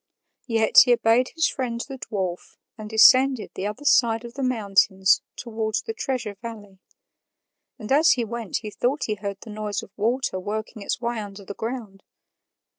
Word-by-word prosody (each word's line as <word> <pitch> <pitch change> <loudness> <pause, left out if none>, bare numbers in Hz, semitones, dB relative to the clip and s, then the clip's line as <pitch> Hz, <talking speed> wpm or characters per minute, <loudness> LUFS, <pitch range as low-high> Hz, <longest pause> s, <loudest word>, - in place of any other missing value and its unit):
Yet 225 -2 +5
he 245 - +4
obeyed 235 +2 +3
his 325 -1 +2
friend 240 -3 -3
the 270 0 -8
dwarf 185 -7 -5 0.2
and 215 -2 -9
descended 255 +2 +5
the 195 - -3
other 210 +8 -7
side 235 -4 +3
of 235 - -9
the 275 - -6
mountains 195 -6 +2
towards 220 -2 -3
the 450 - -4
Treasure 255 - -3
Valley; 210 -5 -9 1.0
and 215 -2 -8
as 310 +4 +5
he 240 -2 -2
went 230 -3 -4
he 210 - -6
thought 260 +7 -1
he 215 - -1
heard 200 -1 -5
the 220 - -10
noise 210 -1 -4
of - - -13
water 230 -1 -1
working 215 +3 -5
its - - -3
way 235 -1 -2
under 200 -1 -8
the 200 - -6
ground. 220 -4 -6
225 Hz, 175 wpm, -24 LUFS, 205-245 Hz, 1.0 s, Yet